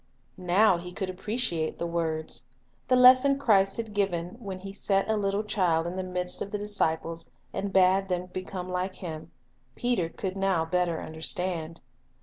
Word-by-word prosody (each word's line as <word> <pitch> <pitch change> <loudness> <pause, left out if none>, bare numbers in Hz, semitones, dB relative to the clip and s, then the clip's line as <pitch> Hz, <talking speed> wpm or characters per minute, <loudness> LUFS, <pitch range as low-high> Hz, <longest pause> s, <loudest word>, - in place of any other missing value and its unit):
Now 180 +1 +4
he 180 +1 -8
could 185 +1 -3
appreciate 185 -4 -1
the 170 - -3
words. 160 -6 -2 0.4
The 255 - +4
lesson 255 +2 +7
Christ 195 -7 +3
had 225 -2 -4
given 180 -4 0
when 195 -5 -6
He 195 0 -7
set 195 -1 +1
a - - +2
little 200 0 0
child 180 -6 +1
in 175 +1 -4
the 190 - -2
midst 180 -1 -2
rue - - 0
Lesson - - -11
of - - -16
the - - +1
disciples 165 -5 -1 0.2
and 200 0 -3
bade 190 +1 +4
them 180 0 -1
become 185 0 -6
like 185 +1 -2
him, 160 -3 -7 0.5
Peter 230 -5 0
could 190 +2 -4
now 195 -4 +1
better 175 -1 0
understand. 165 +1 -3
185 Hz, 175 wpm, -28 LUFS, 170-200 Hz, 0.5 s, lesson